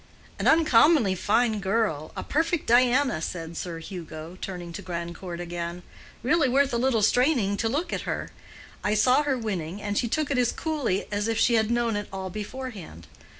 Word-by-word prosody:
"An - - 0
uncommonly 300 - +5
fine 220 +4 +1
girl, 195 -6 -1
a - - -3
perfect 330 +1 0
Diana," 250 - +3
said 165 -1 -5
Sir 170 -1 -5
Hugo, 165 -1 -8
turning 175 -3 -6
to - - -6
Grandcourt 170 0 -6
again. 175 0 -5 0.4
"Really 285 +2 +3
worth 275 +1 +2
a - - +2
little 235 -3 +2
straining 245 -3 +3
to 225 - 0
look 320 +8 -2
at - - -2
her. - - -3 0.5
I 210 +1 +1
saw 250 +6 +4
her 285 -3 0
winning, 195 -6 -4
and 205 0 -3
she 235 - +1
took 295 +5 -1
it 265 - +2
as 245 -1 +2
coolly 290 - -1
as 205 +1 -1
if 225 -1 0
she 240 - +3
had 220 -1 +3
known 235 -2 +1
it 205 0 -3
all 190 -1 -5
beforehand. 210 - -7
215 Hz, 185 wpm, -26 LUFS, 180-255 Hz, 0.5 s, uncommonly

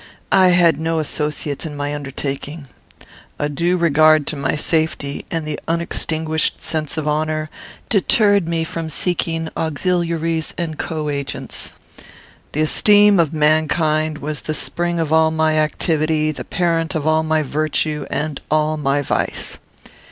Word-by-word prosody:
I 190 -1 +6
had 175 -4 +4
no 165 +1 -1
associates 150 -2 -2
in 150 -2 -6
my 145 0 -2
undertaking. 140 +1 -5 0.7
A 145 - -1
due 170 +5 0
regard 155 -2 +4
to 155 - -1
my 140 0 -1
safety, 155 -2 -1
and 165 -2 -3
the 150 -1 -4
unextinguished 160 -1 -1
sense 155 -1 -3
of 155 -1 -2
honour, 155 +1 -1 0.4
deterred 205 -2 +3
me 165 -1 0
from 160 0 -5
seeking 165 -1 -1
auxiliaries 165 0 -1
and 165 -3 -4
co 155 -2 -3
agents. 140 -1 -5 0.8
The 150 - 0
esteem 205 +5 +5
of 160 -3 +3
mankind 155 0 +1
was 150 0 -4
the 155 - -3
spring 175 +1 -1
of 160 -1 0
all 160 0 +5
my 160 0 +1
activity, 155 0 +1
the 150 - -7
parent 165 -1 0
of 155 -2 -2
all 155 0 +3
my 155 -1 +1
virtue 155 +1 -1
and 150 -2 -3
all 155 0 +1
my 145 -1 0
vice. - - -2
155 Hz, 145 wpm, -19 LUFS, 150-165 Hz, 0.8 s, I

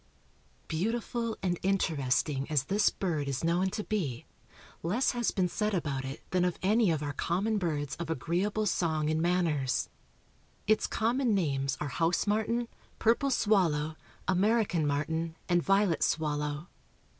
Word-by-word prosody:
_) - - -34
Beautiful 225 +6 -2
and 175 -2 0
interesting 145 -6 0
as 150 -4 +2
this 200 +9 +3
bird 160 -7 -2
is 135 +1 -2
known 175 +3 +2
to 210 +3 -4
be, 160 - -2 0.6
less 210 +11 +1
has 240 -2 0
been 185 -2 +1
said 210 +3 -1
about 140 -6 -2
it 135 +2 -7
than 180 -1 +2
of 180 -1 0
any 215 +1 +4
of 155 -3 0
our 145 -1 -3
common 200 +9 0
birds 150 -6 -2
of 170 -2 -5
agreeable 180 - 0
song 160 -5 +1
and 155 0 +1
manners. 150 - +1 0.8
Its 215 +1 +3
common 235 0 +1
names 140 -6 0
are 150 - -3
house 165 +4 +1
martin, 220 +3 0 0.3
purple 235 +5 +2
swallow, 170 - +2 0.3
American 190 -4 +2
martin, 160 +3 -1
and 175 -1 +3
violet 195 -2 +2
swallow. 150 +1 -1
175 Hz, 145 wpm, -30 LUFS, 150-210 Hz, 0.8 s, any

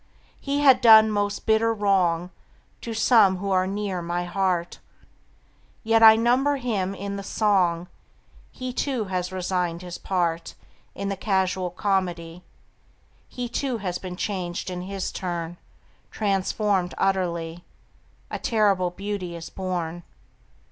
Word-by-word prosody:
He 285 +1 -1
had 270 -3 +6
done 220 -1 +8
most 205 -1 -2
bitter 225 +1 +3
wrong 185 -5 +1 0.5
To 230 - -6
some 220 -4 +4
who 195 +1 -3
are 185 0 +2
near 195 -2 -3
my 175 +1 -2
heart, 175 -1 -1 1.0
Yet 225 0 +3
I 220 -1 +10
number 250 +5 +2
him 210 -7 -2
in 200 0 -5
the - - -5
song; 185 -5 +1 0.6
He, 255 -1 -6
too, 260 -3 -1
has 185 -1 -3
resigned 180 -2 -2
his 175 -1 -7
part 170 -3 -2 0.4
In 200 0 -3
the 195 - -2
casual 190 -2 0
comedy; 180 -3 -2 0.9
He, 245 -1 -5
too, 250 +1 -2
has 185 -4 -4
been 185 -1 -7
changed 185 -2 -3
in 180 0 -5
his 195 +1 -4
turn, 175 -2 -4 0.5
Transformed 195 -2 0
utterly: 175 -3 -1 0.7
A - - -3
terrible 200 -5 +2
beauty 190 -1 -5
is 165 -1 -8
born. 175 -3 -4
190 Hz, 130 wpm, -24 LUFS, 180-215 Hz, 1.0 s, I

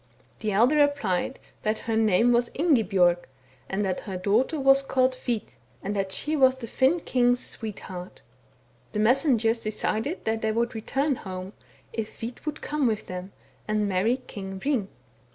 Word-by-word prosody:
The 215 -1 -1
elder 240 +9 +4
replied 270 -7 +1
— - - -35
that 215 0 0
her 225 - 0
name 220 +2 +4
was 240 0 +3
Ingibjorg, 200 - +3 0.5
and 200 +2 -1
that 185 -1 -1
her 190 -3 -5
daughter 220 - +1
was 270 0 +5
called 260 -1 +2
Hvit, 245 -3 -3 0.3
and 205 +2 -2
that 195 -1 -1
she 305 +9 0
was 260 -3 +5
the 260 -3 -7
Finn 265 +8 +2
king's 245 -2 +2
sweetheart. 190 -5 -7 0.7
The 210 - -1
messengers 235 -1 +3
decided 220 - -2
that 220 0 0
they 220 - +1
would 235 +2 0
return 270 +5 -1
home, 185 0 -7 0.4
if 220 -2 -5
Hvit 240 +6 -7
would 305 - -4
come 295 -3 0
with 215 -2 -1
them 185 +1 -6 0.4
and 215 -1 +1
marry 200 +6 +2
King 195 -6 -8
Hring. 255 -5 0
225 Hz, 165 wpm, -26 LUFS, 200-260 Hz, 0.7 s, was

